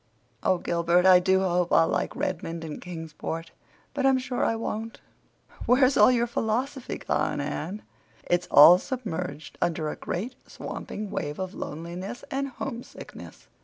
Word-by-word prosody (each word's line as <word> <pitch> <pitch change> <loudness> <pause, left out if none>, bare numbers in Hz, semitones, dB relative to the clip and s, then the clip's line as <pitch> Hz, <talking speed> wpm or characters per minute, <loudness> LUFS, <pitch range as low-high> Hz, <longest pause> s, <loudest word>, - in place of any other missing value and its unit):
Oh, 185 - +2
Gilbert, 170 +1 +2
I 185 -1 +8
do 190 +1 +3
hope 180 -2 +1
I'll 165 - +5
like - - -1
Redmond 165 -2 -3
and 155 -2 -7
Kingsport, 165 -1 -6 0.4
but 275 -1 -2
I'm 270 -1 +5
sure 255 -1 -2
I 225 - +1
won't!" 225 0 -4 0.7
"Where's 255 +2 +5
all - - +7
your 240 -2 +3
philosophy 240 +3 -2
gone, - - -1
Anne?" 190 +7 -4 0.4
"It's 175 0 0
all 170 +5 +9
submerged 180 - -5
under 160 -2 0
a - - -4
great, 220 +9 -4 0.2
swamping 210 -1 -6
wave 150 -6 -3
of 185 0 -4
loneliness 175 +8 -6
and 275 +1 -1
homesickness. 260 -2 -9
185 Hz, 145 wpm, -26 LUFS, 170-240 Hz, 0.7 s, all